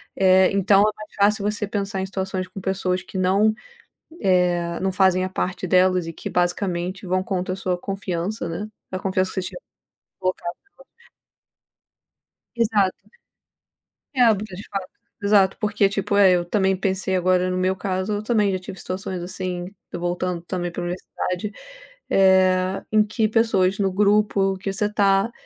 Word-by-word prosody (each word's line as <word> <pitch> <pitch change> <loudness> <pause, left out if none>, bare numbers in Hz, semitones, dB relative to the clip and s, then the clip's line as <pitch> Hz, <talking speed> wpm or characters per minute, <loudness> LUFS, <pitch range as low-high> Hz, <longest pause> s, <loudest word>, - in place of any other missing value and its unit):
É, 190 -1 +5
então 195 0 +4
é - - +6
mais 215 0 -11
fácil 205 0 +2
você 210 0 -1
pensar 200 -1 -2
em 190 - -2
situações 190 -1 -3
com 190 +1 -9
pessoas 185 -1 -1
que, 190 - -8
não, 195 +4 +3 0.7
eh, 175 -2 +2
não 190 0 0
fazem 185 -1 +3
a 185 - -4
parte 185 0 -3
delas 185 -1 +3
e - - -4
que, - - -6
basicamente, 180 +1 -1
vão 185 +1 +1
contra 185 -1 -2
a 190 - -6
sua 185 -2 -1
confiança, 185 0 -3
né, 205 +6 -4 0.2
a 185 - -3
confiança 185 -1 0
que 190 - -1
você 180 - -4
tinha - - -9 0.6
colocado 185 -2 -2 0.4
nelas. 475 0 -25 1.5
Exato. 210 -5 +2 1.2
é 250 -2 +5
porque 215 +1 -7
a - - -5
gente 200 - -10
fala 195 -2 -3 0.4
exato, 200 -2 +4
porque, 210 -2 +2
tipo, 200 +1 -1
eh, 195 -2 +7
eu 175 -1 +1
também 190 0 +1
pensei, 190 0 -1
agora, 185 0 +2
no 185 - -1
meu 185 +1 +1
caso, 190 +1 -2
eu 205 +1 -2
também 215 -3 +2
já 185 - -1
tive 185 +1 -9
situações 185 -1 -4
assim, 180 -1 -4 0.3
voltando, 175 0 -2
também, 175 -1 -3
para 175 - -5
universidade, 180 +2 -4 0.6
eh, 190 0 +3
em 215 0 +5
que 215 +1 0
pessoas 205 -4 +2
no 195 -1 +1
grupo 200 -1 +2
que 195 0 -3
você 205 +2 +1
está, 200 +1 +2
190 Hz, 165 wpm, -23 LUFS, 185-200 Hz, 1.5 s, eh